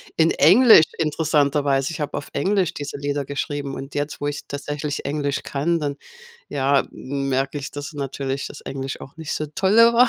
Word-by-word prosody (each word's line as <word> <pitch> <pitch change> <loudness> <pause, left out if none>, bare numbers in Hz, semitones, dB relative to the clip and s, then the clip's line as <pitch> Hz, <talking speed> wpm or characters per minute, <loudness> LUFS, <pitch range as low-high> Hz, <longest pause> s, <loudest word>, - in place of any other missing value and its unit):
in 165 0 +4
Englisch, 210 -2 +7
interessanterweise. 145 -3 +1
Ich 165 - -6
habe 150 - -2
auf - - -6
Englisch 185 +2 +1
diese 145 -1 -5
Lieder 145 0 -2
geschrieben 140 0 -3
und 135 +1 -8
jetzt, 145 +1 -3
wo 145 - 0
ich 145 - -4
tatsächlich 145 +1 -4
Englisch 145 0 -1
kann, 165 +5 0
dann, 145 -1 -2 0.5
ja, 140 0 +2
merke 135 +1 -2
ich, 140 - -6
dass 145 +2 -6
natürlich 135 -1 -3
das - - -11
Englisch 135 0 -5
auch 135 - -11
nicht 160 -2 -5
so 155 - -2
toll 195 +2 +2
war. 235 +2 +7
145 Hz, 180 wpm, -22 LUFS, 140-160 Hz, 0.5 s, Englisch